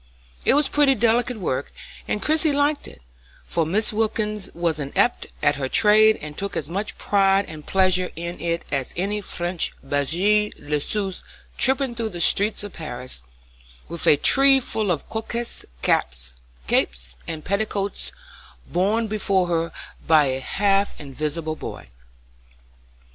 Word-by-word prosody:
It -, -, +5 dB
was 295 Hz, 0 st, +4 dB
pretty 285 Hz, -2 st, +3 dB
delicate 235 Hz, +2 st, +1 dB
work, 140 Hz, -8 st, -3 dB, 0.4 s
and 210 Hz, -, -2 dB
Christie 310 Hz, 0 st, +3 dB
liked 285 Hz, +1 st, +1 dB
it, -, -, -14 dB, 0.4 s
for 165 Hz, -2 st, 0 dB
Mrs. 210 Hz, +8 st, 0 dB
Wilkins 215 Hz, -2 st, -1 dB
was 170 Hz, -2 st, -1 dB
an 140 Hz, -2 st, -4 dB
adept 200 Hz, +6 st, +1 dB, 0.2 s
at 145 Hz, 0 st, +3 dB
her 135 Hz, -2 st, -3 dB
trade 215 Hz, +3 st, +5 dB
and 150 Hz, -1 st, -7 dB
took 200 Hz, +4 st, -3 dB
as 155 Hz, +1 st, -3 dB
much 200 Hz, +4 st, -3 dB
pride 195 Hz, -1 st, +2 dB
and 155 Hz, -1 st, -10 dB
pleasure 185 Hz, -1 st, +2 dB
in 170 Hz, +1 st, -6 dB
it 170 Hz, 0 st, -1 dB
as 135 Hz, -2 st, -2 dB
any 205 Hz, +3 st, -1 dB
French 175 Hz, -2 st, -2 dB
blanchisseuse 180 Hz, +4 st, 0 dB, 0.3 s
tripping 265 Hz, -1 st, +3 dB
through 230 Hz, -1 st, -2 dB
the 175 Hz, -4 st, -7 dB
streets 205 Hz, +5 st, +4 dB
of 205 Hz, -, -7 dB
Paris 125 Hz, -, -6 dB, 0.7 s
with 170 Hz, 0 st, -1 dB
a 145 Hz, -, +6 dB
tree 270 Hz, -, +6 dB
full 220 Hz, -5 st, -1 dB
of 160 Hz, -6 st, -1 dB
coquettish 230 Hz, +1 st, -3 dB, 0.2 s
caps, 60 Hz, 0 st, 0 dB, 0.3 s
capes, -, -, 0 dB
and 160 Hz, -2 st, -6 dB
petticoats 200 Hz, 0 st, -1 dB, 0.5 s
borne 205 Hz, +6 st, 0 dB
before 200 Hz, -3 st, +1 dB
her 165 Hz, -1 st, 0 dB, 0.4 s
by 155 Hz, -2 st, +6 dB
a 130 Hz, -1 st, -1 dB
half 200 Hz, +7 st, 0 dB
invisible 150 Hz, +3 st, -4 dB
boy. -, -, -8 dB
190 Hz, 145 wpm, -23 LUFS, 155-215 Hz, 0.7 s, a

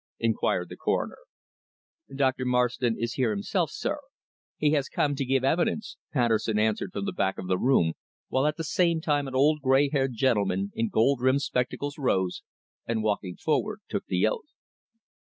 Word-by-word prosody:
inquired -, -, 0 dB
the -, -, -9 dB
Coroner. -, -, -1 dB, 1.0 s
"Dr. 130 Hz, -2 st, +1 dB
Marston 125 Hz, -1 st, +1 dB
is 115 Hz, 0 st, -2 dB
here 125 Hz, -4 st, +1 dB
himself, 100 Hz, -2 st, 0 dB
sir. -, -, -3 dB, 0.6 s
He 150 Hz, -1 st, +2 dB
has 145 Hz, -2 st, +1 dB
come 145 Hz, -, +1 dB
to 140 Hz, 0 st, -2 dB
give 130 Hz, 0 st, +1 dB
evidence," 170 Hz, +9 st, 0 dB, 0.2 s
Patterson 115 Hz, -4 st, +1 dB
answered 110 Hz, -, 0 dB
from 200 Hz, -, -4 dB
the 195 Hz, -, -1 dB
back 95 Hz, -, 0 dB
of -, -, -5 dB
the 90 Hz, 0 st, +1 dB
room, 105 Hz, -11 st, +3 dB, 0.3 s
while 130 Hz, +3 st, +1 dB
at 150 Hz, -, -1 dB
the 165 Hz, -, -3 dB
same 170 Hz, 0 st, +2 dB
time 145 Hz, -3 st, 0 dB
an 130 Hz, -, -6 dB
old 150 Hz, +3 st, +3 dB
grey 135 Hz, +1 st, +4 dB
haired 135 Hz, -3 st, 0 dB
gentleman 100 Hz, -5 st, +1 dB
in 115 Hz, -1 st, -1 dB
gold 120 Hz, +3 st, +2 dB
rimmed 130 Hz, +2 st, +3 dB
spectacles 140 Hz, +4 st, -2 dB
rose, 95 Hz, -9 st, 0 dB, 0.5 s
and 115 Hz, -2 st, -1 dB
walking 100 Hz, -4 st, -1 dB
forward 205 Hz, +8 st, -1 dB
took -, -, -3 dB
the -, -, +2 dB
oath. 470 Hz, -3 st, -2 dB
130 Hz, 175 wpm, -27 LUFS, 115-145 Hz, 1.0 s, grey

